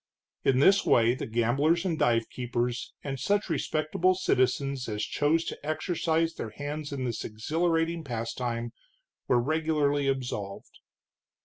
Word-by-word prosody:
In 130 - +3
this 190 +9 +5
way 115 0 +4
the 130 - -5
gamblers 135 - +2
and 175 -3 +1
divekeepers, 120 +1 0
and 135 -2 -4
such 200 - 0
respectable 160 +4 +1
citizens 135 -6 0
as 105 -1 -2
chose 160 +3 +1
to - - -6
exercise 165 +1 0
their 115 - -5
hands 145 +4 -5
in 135 -2 -3
this 120 -2 -3
exhilarating 165 +8 0
pastime, 120 -1 -3 0.5
were 125 - +4
regularly 145 0 +1
absolved. 125 -7 -4
140 Hz, 125 wpm, -28 LUFS, 120-160 Hz, 0.5 s, this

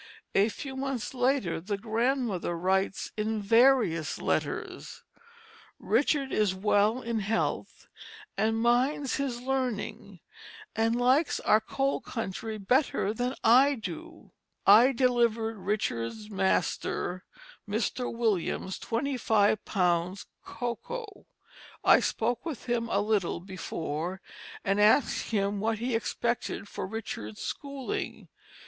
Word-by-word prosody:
A 200 +3 +4
few 265 +5 -7
months 270 -3 -3
later 250 -10 +1
the 200 +3 -3
grandmother 225 -4 -1
writes 190 +3 0
in 215 0 -1
various 215 - +3
letters: - - -3 0.7
"Richard 275 -2 +1
is 205 -3 +1
well 210 +5 +2
in 230 -1 -1
health, 215 +2 -2 0.5
and 225 +1 +1
minds 255 +4 +2
his 265 -4 -2
Learning 255 -4 -3 0.6
and 225 +1 +2
likes 255 +6 +3
our 215 +1 +4
Cold 270 +5 -1
country 220 -1 -4
better 210 0 +1
than 245 +3 -2
I 265 +5 +6
do.... 185 -9 -8 0.3
I 230 +6 +8
delivered 235 -3 +1
Richard's 200 - -2
Master, 185 -1 0 0.5
Mr. 225 +4 -1
Williams, 210 -5 -1
25 225 -5 +1
lbs. 180 0 0 0.2
Cocoa. 405 - -6 0.6
I - - +7
spoke 235 +2 -1
with 320 -6 -6
him 235 -2 -1
a - - +2
little 205 -6 0
before 175 -1 -4 0.5
and 195 +1 +2
asked 215 +6 +3
him 200 -2 0
what 220 +2 0
he 240 +3 -2
expected 235 -1 -2
for 190 - -5
Richard's 185 - -6
schooling. 280 -2 -5
225 Hz, 110 wpm, -29 LUFS, 195-250 Hz, 0.7 s, I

